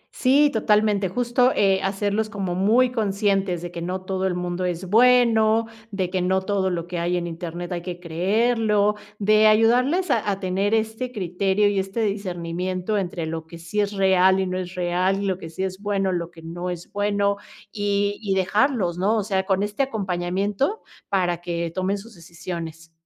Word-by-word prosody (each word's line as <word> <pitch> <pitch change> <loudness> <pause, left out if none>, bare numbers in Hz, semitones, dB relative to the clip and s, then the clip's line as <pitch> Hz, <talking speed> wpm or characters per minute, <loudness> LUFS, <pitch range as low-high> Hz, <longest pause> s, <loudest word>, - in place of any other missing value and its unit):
Sí, 285 +3 +4
totalmente, 210 -3 +2
justo, 245 +3 +2
eh, 195 -1 +3
hacerlos 205 +2 -1
como 195 -4 -3
muy 225 +7 +3
conscientes 195 -5 0
de 175 - -6
que 170 - -6
no 185 +2 -3
todo 190 0 -1
el 180 - -1
mundo 180 0 -3
es 180 +1 -3
bueno, 230 0 +4 0.2
de 190 -4 -2
que 185 -1 0
no 190 +1 +1
todo 195 -2 0
lo 170 -2 -3
que 175 -1 -4
hay 175 +1 0
en 175 - -2
Internet 170 +1 -6
hay 175 -1 -3
que 175 0 -6
creerlo, 210 +4 +1 0.2
de 215 +1 +4
ayudarles 250 +10 +3
a 210 -2 +1
a 195 - -1
tener 195 +3 0
este 220 +3 -2
criterio 195 0 +1
y 200 -1 +1
este 195 +4 -3
discernimiento, 185 0 -2
entre 175 -3 -3
lo 160 0 -5
que 170 - -10
sí 170 +5 -4
es 205 0 +1
real 190 -1 +4
y 190 - +1
no 185 0 -2
es 180 0 -6
real, 185 +2 0
lo 190 -2 -1
que 165 - -8
sí 185 - -4
es 190 +1 -4
bueno, 195 -2 0
lo 170 -1 -2
que 165 -2 -15
no 175 +2 -5
es 175 -1 -7
bueno, 205 0 +1 0.3
y 205 0 -1
y 195 -3 -1
dejarlos, 190 -2 +1
¿no?, 210 +4 +2
o 210 - 0
sea, 190 -2 -1
con 195 0 +1
este 205 +5 -2
acompañamiento 200 - -1 0.3
para 175 -3 0
que 170 -1 -3
tomen 190 +2 -1
sus 225 +4 -12
decisiones. 165 -2 -8
195 Hz, 185 wpm, -23 LUFS, 180-210 Hz, 0.3 s, Sí